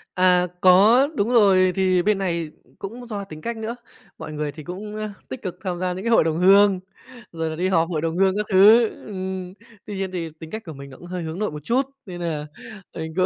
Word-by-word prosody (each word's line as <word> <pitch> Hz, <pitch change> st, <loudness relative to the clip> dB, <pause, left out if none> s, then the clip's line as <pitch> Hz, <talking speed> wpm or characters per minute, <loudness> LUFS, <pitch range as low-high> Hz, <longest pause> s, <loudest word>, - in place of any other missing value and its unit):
À, 180 Hz, -1 st, +4 dB
có, 210 Hz, +9 st, +6 dB
đúng 210 Hz, -2 st, 0 dB
rồi, 195 Hz, -6 st, +5 dB
thì 185 Hz, -2 st, +2 dB
bên 210 Hz, 0 st, +2 dB
này 170 Hz, -4 st, -2 dB, 0.3 s
cũng 240 Hz, +5 st, -8 dB
do 205 Hz, -3 st, -5 dB
tính 155 Hz, -5 st, -11 dB
cách 235 Hz, +4 st, -4 dB
nữa. 220 Hz, +2 st, -4 dB, 0.4 s
Mọi 155 Hz, -, -8 dB
người 150 Hz, -1 st, -3 dB
thì 155 Hz, +2 st, -11 dB
cũng, 200 Hz, +6 st, -7 dB
ơ, 215 Hz, 0 st, -4 dB, 0.2 s
tích 260 Hz, -, -7 dB
cực 185 Hz, -3 st, -5 dB
tham 180 Hz, -3 st, -3 dB
gia 180 Hz, 0 st, -1 dB
những 185 Hz, +2 st, -6 dB
cái -, -, 0 dB
hội 230 Hz, -, +5 dB
đồng 160 Hz, 0 st, -1 dB
hương, 195 Hz, +2 st, +5 dB, 0.5 s
rồi 165 Hz, -1 st, -3 dB
là 160 Hz, -, -5 dB
đi 180 Hz, +3 st, -1 dB
họp 165 Hz, -3 st, +2 dB
hội 160 Hz, -4 st, -2 dB
đồng 165 Hz, +1 st, -2 dB
hương 190 Hz, 0 st, +3 dB
các 210 Hz, -, -1 dB
thứ. 215 Hz, +4 st, +7 dB, 0.2 s
Ừm, 185 Hz, -2 st, -5 dB, 0.3 s
tuy 205 Hz, -, -6 dB
nhiên 190 Hz, -1 st, -3 dB
thì 170 Hz, -3 st, -4 dB
tính 160 Hz, -1 st, -10 dB
cách 220 Hz, +1 st, -6 dB
của 160 Hz, -, -7 dB
mình 140 Hz, 0 st, -10 dB
nó 130 Hz, -, -13 dB
cũng 175 Hz, -, -12 dB
hơi 180 Hz, -1 st, -5 dB
hướng 160 Hz, +3 st, -5 dB
nội 210 Hz, -4 st, -1 dB
một 150 Hz, -1 st, -8 dB
chút. 245 Hz, +8 st, +2 dB, 0.2 s
Nên 175 Hz, -2 st, -8 dB
nà 155 Hz, -3 st, -3 dB, 0.5 s
mình 160 Hz, -1 st, -5 dB
cũng 185 Hz, 0 st, +3 dB
185 Hz, 245 wpm, -23 LUFS, 165-205 Hz, 0.5 s, thứ